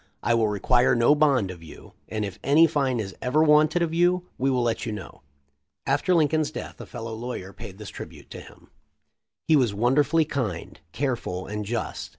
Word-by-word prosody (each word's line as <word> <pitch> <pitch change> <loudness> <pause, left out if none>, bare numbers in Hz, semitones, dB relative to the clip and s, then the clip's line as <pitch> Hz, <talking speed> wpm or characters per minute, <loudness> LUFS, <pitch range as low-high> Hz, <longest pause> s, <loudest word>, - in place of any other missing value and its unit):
I 120 - +2
will 115 -2 +2
require 120 +5 +2
no 120 +4 +5
bond 140 -10 +2
of 85 -2 -11
you, 80 - -13 0.2
and 105 -1 -2
if 100 -2 -8
any 150 +5 +6
fine 140 -6 0
is 95 -3 -4
ever 145 +5 +2
wanted 155 +2 +4
of 165 -1 -2
you, 175 +1 +2
we 135 +2 0
will 125 -2 +1
let 115 -1 -1
you 115 - -3
know." 105 -9 -8 0.6
After 145 +7 +1
Lincoln's 155 -1 +2
death - - -8
a - - -9
fellow 115 0 -7
lawyer 110 -4 -6
paid 95 -1 -10
this 105 -1 -8
tribute - - -11
to - - -8
him - - -17 0.4
:* - - -56
"He 160 - +5
was 120 -8 +2
wonderfully 145 +8 +2
kind, 115 - -4
careful, 120 -9 -3
and 105 0 -5
just. 115 +2 -4
125 Hz, 195 wpm, -25 LUFS, 105-150 Hz, 0.6 s, any